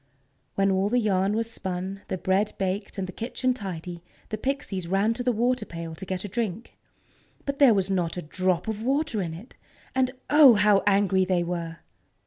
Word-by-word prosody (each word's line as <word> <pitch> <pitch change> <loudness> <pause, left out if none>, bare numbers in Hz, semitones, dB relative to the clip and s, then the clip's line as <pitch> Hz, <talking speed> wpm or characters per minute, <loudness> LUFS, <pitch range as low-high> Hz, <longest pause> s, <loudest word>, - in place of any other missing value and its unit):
When 195 0 +2
all 190 +1 +1
the 245 - +2
yarn 200 -3 +2
was 230 +1 -2
spun, 190 0 -5
the 190 - -2
bread 190 +3 +1
baked, 195 +2 -3
and 190 - -2
the 185 - -7
kitchen 250 +5 -1
tidy, 180 -6 -6 0.3
the 215 - -3
Pixies 240 -9 -3
ran 195 +5 +2
to 245 - -5
the 250 0 +2
water 245 +3 +1
pail 165 -1 -7
to 180 +4 -9
get 185 0 -3
a - - -3
drink. 220 0 -4 0.7
But 280 0 -3
there 265 -6 +7
was 195 0 0
not 180 -2 -1
a 180 - -4
drop 185 +4 -1
of 220 -1 -3
water 270 -2 0
in 165 -3 -4
it! 205 +10 -13 0.4
And, 260 -1 +2 0.2
oh! 295 -5 +8
how 205 -1 +4
angry 195 -1 +3
they 180 -2 +1
were! 170 -1 -4
195 Hz, 195 wpm, -26 LUFS, 185-230 Hz, 0.7 s, oh